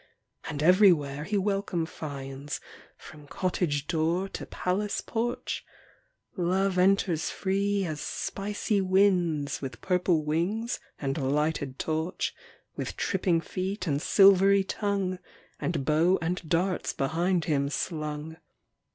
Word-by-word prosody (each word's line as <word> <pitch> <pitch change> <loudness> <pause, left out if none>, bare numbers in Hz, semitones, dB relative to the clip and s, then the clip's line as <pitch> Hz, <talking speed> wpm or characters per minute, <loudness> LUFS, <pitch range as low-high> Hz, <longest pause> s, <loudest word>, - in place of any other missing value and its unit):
And 150 0 -3
everywhere 160 -6 +4
he 205 +4 0
welcome 195 -4 0
finds, 140 -2 -6 0.4
From 150 -2 -13
cottage 160 -5 -1
door 170 +3 0
to - - -7
palace 200 +3 -1
porch 240 +1 -3 0.7
Love 185 +1 +1
enters 185 -3 +2
free 200 0 0
as 155 -3 -4
spicy 205 +1 -2
winds, 185 -6 +2
With 135 -2 -6
purple 180 -4 +1
wings 190 +10 -1 0.2
and 140 +1 -2
lighted 145 0 0
torch, 160 +3 -2 0.4
With - - -5
tripping 170 -4 +1
feet 185 +2 -3
and 145 -3 0
silvery 195 +1 +6
tongue, 195 -2 -1 0.4
And 155 -6 -2
bow 165 +6 +3
and 170 -1 -3
darts 180 +2 0
behind 170 +5 0
him 140 -3 +1
slung. 155 0 -4
175 Hz, 115 wpm, -28 LUFS, 150-195 Hz, 0.7 s, silvery